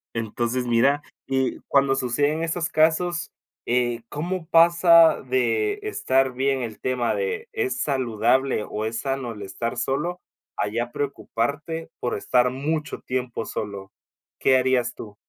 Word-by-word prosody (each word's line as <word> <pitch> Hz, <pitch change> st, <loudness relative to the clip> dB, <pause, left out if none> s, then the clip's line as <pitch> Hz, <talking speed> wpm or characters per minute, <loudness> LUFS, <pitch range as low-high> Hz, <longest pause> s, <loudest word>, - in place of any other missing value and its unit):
Entonces, 120 Hz, +3 st, -2 dB
mira, 135 Hz, +5 st, +3 dB, 0.2 s
que 130 Hz, -1 st, 0 dB
cuando 140 Hz, -1 st, +3 dB
suceden 145 Hz, +5 st, 0 dB
esos 165 Hz, 0 st, -1 dB
casos, 170 Hz, +2 st, +1 dB, 0.4 s
eh, 120 Hz, -1 st, +1 dB
¿cómo 170 Hz, +2 st, -4 dB
pasa 170 Hz, -1 st, +6 dB
de 130 Hz, -, 0 dB
estar 135 Hz, -, +1 dB
bien 135 Hz, +1 st, 0 dB
el 110 Hz, -2 st, -6 dB
tema 125 Hz, -2 st, 0 dB
de, 460 Hz, -1 st, -2 dB
es 430 Hz, -3 st, -2 dB
saludable 130 Hz, -2 st, +1 dB
o 110 Hz, +1 st, -3 dB
es 115 Hz, +1 st, -3 dB
sano 135 Hz, -4 st, -3 dB
el 105 Hz, -1 st, -8 dB
estar 115 Hz, +5 st, -4 dB
solo, 150 Hz, +8 st, -1 dB, 0.4 s
a -, -, 0 dB
ya 120 Hz, +3 st, -2 dB
preocuparte 145 Hz, +4 st, -3 dB
por 120 Hz, -, -2 dB
estar 125 Hz, +4 st, +2 dB
mucho 150 Hz, +4 st, -3 dB
tiempo 125 Hz, -2 st, -3 dB
solo? 100 Hz, -2 st, -5 dB, 0.5 s
¿Qué 130 Hz, -1 st, +4 dB
harías 125 Hz, -2 st, +1 dB
tú? 105 Hz, -2 st, -10 dB
130 Hz, 135 wpm, -24 LUFS, 120-160 Hz, 0.5 s, pasa